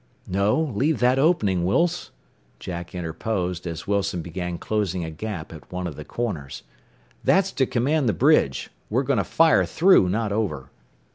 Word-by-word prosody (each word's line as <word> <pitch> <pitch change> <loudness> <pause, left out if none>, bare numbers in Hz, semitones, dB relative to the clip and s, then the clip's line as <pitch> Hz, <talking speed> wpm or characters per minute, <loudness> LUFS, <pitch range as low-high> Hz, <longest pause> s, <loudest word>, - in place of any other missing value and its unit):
"No; 100 +8 +1
leave 150 0 0
that 125 +2 +3
opening, 105 - +2
Wilse," 170 - +1 0.5
Jack 85 0 -6
interposed 90 +1 -3
as 80 -2 -5
Wilson 100 -4 -1
began 90 +1 -4
closing 95 -5 -2
a 80 - -6
gap 85 -1 -6
at 80 - -13
one 90 0 -4
of 85 -5 -5
the - - -8
corners. 80 - -4 0.6
"That's 195 0 +3
to 130 - +1
command 135 +2 +1
the - - +2
bridge. 135 - +2 0.2
We're 125 +6 +1
going 135 -1 +1
to 100 - +2
fire 165 - +4
through, 175 - +4
not 105 +2 -1
over." 100 - -2
100 Hz, 160 wpm, -24 LUFS, 90-130 Hz, 0.6 s, fire